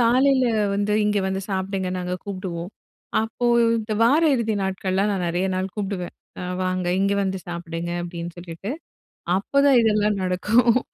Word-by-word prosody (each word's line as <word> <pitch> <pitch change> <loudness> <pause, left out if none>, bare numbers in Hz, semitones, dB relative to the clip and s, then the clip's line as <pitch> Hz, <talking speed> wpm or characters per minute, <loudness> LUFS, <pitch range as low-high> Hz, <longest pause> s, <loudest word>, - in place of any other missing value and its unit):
காலைல 255 +2 +4 0.3
வந்து 205 +1 0
இங்க 210 -1 +2
வந்து 190 0 -1
சாப்பிடுங்க 190 -1 -2
நாங்க 180 0 -2
கூப்பிடுவோம். 185 -2 -5 0.5
அப்போ 225 +2 -4 0.3
இந்த 220 -1 -3
வார 280 +8 +5
இறுதி 225 -3 0
நாட்கள்லாம் 190 +1 0
நான் 185 -2 -1
நெறைய 175 +3 0
நாள் 185 +1 -1
கூப்பிடுவேன். 195 -4 -3 0.3
"அ - - -4 0.2
வாங்க 185 -1 -1
இங்க 200 +1 +2
வந்து 190 -1 -1
சாப்பிடுங்க!" 170 0 -4
அப்படின்னு 170 0 -5
சொல்லிட்டு, 175 +4 -7 0.7
அப்ப 275 +8 +1
தான் 270 -3 +6
இதெல்லாம் 210 -2 +2
நடக்கும். 220 +7 +3
195 Hz, 150 wpm, -23 LUFS, 180-215 Hz, 0.7 s, தான்